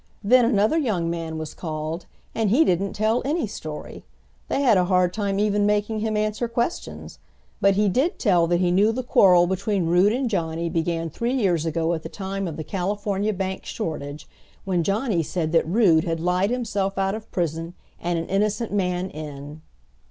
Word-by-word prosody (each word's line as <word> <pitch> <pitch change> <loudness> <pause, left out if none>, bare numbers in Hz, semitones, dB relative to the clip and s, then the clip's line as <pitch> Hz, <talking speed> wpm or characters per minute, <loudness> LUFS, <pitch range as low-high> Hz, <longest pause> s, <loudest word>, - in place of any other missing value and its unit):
Then 245 +4 +5
another 225 +6 +2
young 185 - 0
man 165 -1 -4
was 155 -1 -6
called, 160 +1 -5 0.3
and 220 -2 0
he 280 +10 +4
didn't 190 +2 0
tell 220 +3 +1
any 305 +3 0
story. 155 -7 -8 0.4
They - - 0
had 240 -6 +5
a 180 -1 +3
hard 180 -1 +2
time 200 -2 -1
even 205 0 +2
making 210 +1 0
him 215 0 -1
answer 215 +2 -1
questions. 235 +7 -4 0.4
But 195 0 +4
he 210 +1 +2
did 265 - +1
tell 180 -7 +3
that 175 0 +1
he 175 -1 +2
knew 200 +5 +4
the 255 +3 -3
quarrel 180 -7 +5
between 190 +1 -1
Rood 180 +5 +4
and 255 +3 0
Johnny 170 -5 -2
began 165 -1 -1
three 235 - -2
years 175 - +1
ago 165 +1 0
at 160 - -3
the 160 - -7
time 195 0 -4
of 160 - -6
the 155 - -4
California 200 +3 -1
Bank 190 -1 -3
shortage, 150 -6 -5 0.4
when 185 -3 +1
Johnny 200 +1 0
said 160 0 -2
that 165 -1 +2
Rood 175 -4 +4
had 165 -2 -2
lied 180 +4 +1
himself 205 -6 -2
out 195 0 +1
of 220 0 -7
prison 165 0 -2 0.2
and 175 0 -1
an 165 - -2
innocent 210 +3 0
man 180 -2 -1
in. 150 0 -8
190 Hz, 190 wpm, -24 LUFS, 170-215 Hz, 0.4 s, Then